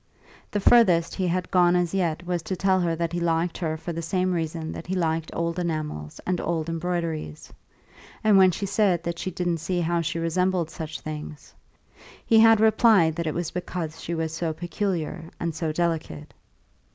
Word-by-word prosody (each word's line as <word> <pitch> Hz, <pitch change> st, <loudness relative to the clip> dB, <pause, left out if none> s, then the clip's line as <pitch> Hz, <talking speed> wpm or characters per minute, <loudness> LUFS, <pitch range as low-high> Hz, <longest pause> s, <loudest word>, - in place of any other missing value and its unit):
The 205 Hz, -, -1 dB
furthest 190 Hz, -7 st, +5 dB
he 185 Hz, -2 st, -1 dB
had 180 Hz, 0 st, -2 dB
gone 180 Hz, -1 st, +4 dB
as 175 Hz, -1 st, +1 dB
yet 175 Hz, -3 st, -1 dB
was 175 Hz, -1 st, -1 dB
to 185 Hz, -, -4 dB
tell 190 Hz, 0 st, +2 dB
her 170 Hz, -2 st, 0 dB
that 170 Hz, 0 st, -2 dB
he 175 Hz, -, -1 dB
liked 170 Hz, 0 st, 0 dB
her 160 Hz, -3 st, -2 dB
for 170 Hz, +2 st, -5 dB
the 165 Hz, -, -4 dB
same 185 Hz, +2 st, 0 dB
reason 160 Hz, -1 st, -3 dB
that -, -, -8 dB
he 190 Hz, -, -2 dB
liked 165 Hz, -2 st, -1 dB
old 170 Hz, +1 st, -2 dB
enamels 155 Hz, -, -4 dB
and 180 Hz, -1 st, -1 dB
old 165 Hz, -1 st, -2 dB
embroideries; 165 Hz, -, -3 dB, 0.7 s
and 215 Hz, -2 st, +5 dB
when 190 Hz, -1 st, +7 dB
she 185 Hz, +3 st, -3 dB
said 195 Hz, -4 st, +1 dB
that 170 Hz, 0 st, -4 dB
she -, -, -3 dB
didn't 175 Hz, -2 st, -2 dB
see 175 Hz, +3 st, -2 dB
how 170 Hz, 0 st, +1 dB
she 170 Hz, +1 st, -2 dB
resembled 170 Hz, 0 st, 0 dB
such 160 Hz, -2 st, -6 dB
things, 150 Hz, -1 st, -8 dB, 0.7 s
he 225 Hz, -2 st, +5 dB
had 225 Hz, -1 st, +7 dB
replied 220 Hz, -7 st, +4 dB
that 170 Hz, -1 st, -3 dB
it 155 Hz, -, -2 dB
was 170 Hz, -1 st, -2 dB
because 175 Hz, -3 st, -5 dB
she 170 Hz, -, -3 dB
was 160 Hz, -1 st, -2 dB
so 165 Hz, -1 st, -2 dB
peculiar 170 Hz, -1 st, -3 dB
and 170 Hz, -1 st, -2 dB
so 160 Hz, 0 st, -2 dB
delicate. 160 Hz, -2 st, -2 dB
170 Hz, 190 wpm, -25 LUFS, 160-180 Hz, 0.7 s, when